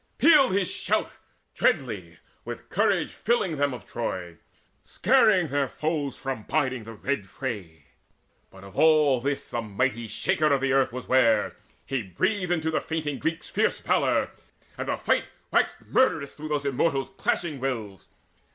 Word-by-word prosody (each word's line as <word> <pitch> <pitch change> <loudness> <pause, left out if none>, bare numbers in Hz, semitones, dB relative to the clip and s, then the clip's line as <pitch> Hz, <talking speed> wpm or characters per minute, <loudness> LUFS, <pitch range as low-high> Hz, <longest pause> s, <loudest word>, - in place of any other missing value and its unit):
Pealed 295 -6 +6
his 195 -1 +1
shout - - 0 0.4
Dreadly, - - 0 0.3
with - - -8
courage - - +1
filling 190 -9 0
them 145 0 +1
of 125 - -8
Troy, 90 -7 -5 0.4
Scaring 215 - +3
their 140 0 +1
foes 150 -1 -2
from 135 -4 -4
biding 130 -2 -1
the 115 - -8
red 105 -3 -3
fray. 95 - -6 0.6
But 95 0 -15
of 100 -1 -8
all 150 -5 +5
this 140 +2 -3
the 120 - -1
mighty 115 +2 -1
Shaker 155 +8 +1
of 135 -1 +2
Earth 135 -2 +2
Was 125 +1 -7
ware: 115 -5 +3 0.3
he 135 -2 -1
breathed 185 - -1
into 160 -2 0
the 155 - 0
fainting 155 -3 -3
Greeks 165 +1 -2
Fierce - - +1
valour, - - +1 0.4
and - - -5
the - - 0
fight - - +1 0.3
waxed - - +1
murderous 160 - +2
Through 155 +1 -8
those 145 -1 -1
Immortals' 135 +1 0
clashing 170 -6 -1
wills. 110 -8 -4
135 Hz, 150 wpm, -26 LUFS, 115-160 Hz, 0.6 s, Pealed